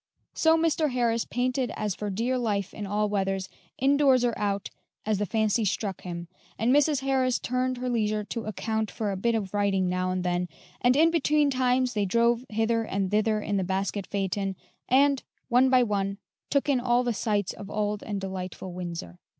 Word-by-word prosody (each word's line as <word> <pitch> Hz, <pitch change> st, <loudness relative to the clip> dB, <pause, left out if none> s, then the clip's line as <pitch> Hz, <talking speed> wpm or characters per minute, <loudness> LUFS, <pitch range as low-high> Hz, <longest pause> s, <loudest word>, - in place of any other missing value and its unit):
So 320 Hz, 0 st, +4 dB
Mr. 320 Hz, -1 st, +2 dB
Harris 235 Hz, -2 st, +1 dB
painted 255 Hz, +1 st, -1 dB
as 210 Hz, -2 st, -1 dB
for 210 Hz, +3 st, -4 dB
dear 235 Hz, +6 st, 0 dB
life 205 Hz, -5 st, -1 dB
in 205 Hz, -2 st, -5 dB
all 210 Hz, +1 st, +1 dB
weathers, 195 Hz, -2 st, -1 dB, 0.3 s
indoors 270 Hz, -2 st, +4 dB
or 240 Hz, -, +1 dB
out, 200 Hz, -1 st, -2 dB, 0.3 s
as 215 Hz, -2 st, +1 dB
the 205 Hz, -, -1 dB
fancy 220 Hz, +2 st, +1 dB
struck 200 Hz, -1 st, -2 dB
him, 170 Hz, -1 st, -6 dB, 0.3 s
and 230 Hz, +4 st, +2 dB
Mrs. 290 Hz, -1 st, +3 dB
Harris 260 Hz, -2 st, +1 dB
turned 255 Hz, +1 st, -1 dB
her 250 Hz, +1 st, -3 dB
leisure 215 Hz, -3 st, 0 dB
to 225 Hz, +3 st, -5 dB
account 220 Hz, +1 st, -2 dB
for 210 Hz, -2 st, -3 dB
a -, -, -2 dB
bit 230 Hz, +5 st, +1 dB
of 200 Hz, -4 st, -3 dB
writing 200 Hz, -2 st, +1 dB
now 185 Hz, 0 st, 0 dB
and 185 Hz, 0 st, -1 dB
then, 180 Hz, 0 st, -1 dB, 0.3 s
and 245 Hz, +1 st, +4 dB
in 325 Hz, +3 st, +5 dB
between 300 Hz, -3 st, +2 dB
times 255 Hz, -1 st, +1 dB
they 210 Hz, -2 st, +1 dB
drove 235 Hz, +4 st, +2 dB
hither 225 Hz, +1 st, +1 dB
and 195 Hz, -3 st, -2 dB
thither 215 Hz, 0 st, +2 dB
in 205 Hz, -1 st, -1 dB
the 190 Hz, -, +1 dB
basket 195 Hz, +1 st, -2 dB
phaeton, 195 Hz, 0 st, -2 dB, 0.3 s
and, 275 Hz, +1 st, +4 dB, 0.3 s
one 255 Hz, +2 st, +5 dB
by 255 Hz, -1 st, +5 dB
one, 200 Hz, -3 st, -1 dB, 0.3 s
took 280 Hz, 0 st, +1 dB
in 275 Hz, -3 st, +3 dB
all 245 Hz, 0 st, +2 dB
the 240 Hz, -1 st, 0 dB
sights 205 Hz, -2 st, -1 dB
of 200 Hz, -, -9 dB
old 210 Hz, 0 st, -1 dB
and 205 Hz, -2 st, -4 dB
delightful 185 Hz, -1 st, -5 dB
Windsor. 170 Hz, -, -6 dB
215 Hz, 190 wpm, -27 LUFS, 195-250 Hz, 0.3 s, in